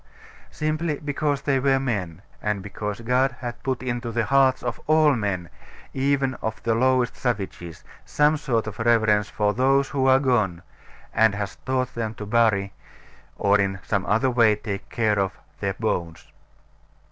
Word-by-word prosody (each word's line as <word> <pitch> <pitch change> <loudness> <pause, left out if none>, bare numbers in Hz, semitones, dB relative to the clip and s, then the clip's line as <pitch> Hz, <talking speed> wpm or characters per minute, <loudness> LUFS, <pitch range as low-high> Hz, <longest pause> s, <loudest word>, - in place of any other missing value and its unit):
Simply 155 0 -2
because 145 -1 -2
they 135 -2 +1
were 135 0 +2
men; 100 -9 -3 0.2
and 105 -2 -2
because 105 +2 -5
God 125 +2 +1
has 120 0 -6
put 130 -2 -2
into 120 -1 -3
the 115 0 0
hearts 135 -1 +3
of 120 -2 -4
all 155 -1 +5
men, 100 -7 -2 0.5
even 135 0 +1
of 110 0 -4
the 115 - +1
lowest 130 +1 +2
savages, 95 -8 -4 0.2
some 150 +1 +2
sort 120 -7 -1
of 110 -1 -7
reverence 110 -3 +3
for 105 -1 0
those 135 +3 +2
who 135 -1 0
are 130 0 +6
gone; 110 -11 0 0.5
and 110 -2 +4
has 100 -1 -4
taught 130 -1 0
them 110 -1 -3
to 105 - -7
bury, 105 -3 +2 0.6
or 100 +1 +3
in 95 -1 0
some 100 -3 -1
other 115 +6 +2
way 115 -3 +4
take 100 -1 -6
care 110 -3 +1
of, 95 -1 0 0.3
their 100 -1 -2
bones. 85 -7 -3
115 Hz, 160 wpm, -24 LUFS, 105-130 Hz, 0.6 s, are